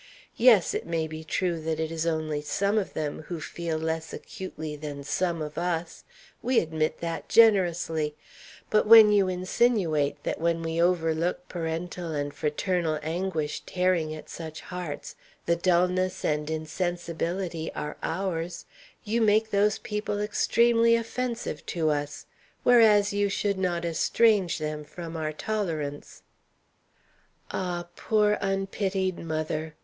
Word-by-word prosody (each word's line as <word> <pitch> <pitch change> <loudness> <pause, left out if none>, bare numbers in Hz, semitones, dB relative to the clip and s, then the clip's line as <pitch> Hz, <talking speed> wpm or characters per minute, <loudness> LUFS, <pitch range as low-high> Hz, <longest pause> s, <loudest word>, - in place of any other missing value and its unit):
Yes, 225 -7 +5
it - - -3
may 165 -1 0
be 155 0 -7
true 170 +1 -1
that 160 0 -2
it 160 0 -2
is 165 0 -2
only 155 -2 -1
some 200 +8 +1
of 195 - -5
them 150 -1 -3
who 175 -2 -4
feel 165 +1 -3
less 160 0 -3
acutely 160 -6 -6
than 145 -1 -6
some 170 +2 -1
of 150 +1 -5
us 170 -1 -3 0.4
we 255 0 +3
admit 155 -1 -1
that 165 -1 -4
generously; 175 -8 +3 0.6
but 215 - +3
when 220 -1 +10
you 200 -2 +4
insinuate 185 -5 +1
that - - -3
when 165 0 +1
we 165 +1 -1
overlook 170 0 +1
parental 170 0 -4
and 145 -1 -2
fraternal 160 +1 -1
anguish 160 -2 -2
tearing 180 -4 +1
at 155 - -10
such 160 -1 -7
hearts 180 -5 -6 0.3
the 170 - +3
dulness 180 +1 +1
and 150 0 0
insensibility 170 +1 -3
are 150 - -4
ours, 170 -1 -3 0.4
you 230 +2 0
make 220 0 +3
those 205 +1 +3
people 210 -2 -3
extremely 230 +2 +3
offensive 230 -7 -3
to 160 -3 +1
us, 145 0 -3 0.4
whereas 215 -4 +5
you 205 0 +1
should 200 -1 -1
not 175 -2 -1
estrange 190 +3 +2
them 150 -1 -4
from 165 +2 -8
our 155 -1 -2
tolerance. 155 -6 -4 1.3
Ah, 175 -2 -3
poor 210 -1 +2
unpitied 195 -1 -1
mother! 155 -1 -3
170 Hz, 135 wpm, -27 LUFS, 160-195 Hz, 1.3 s, when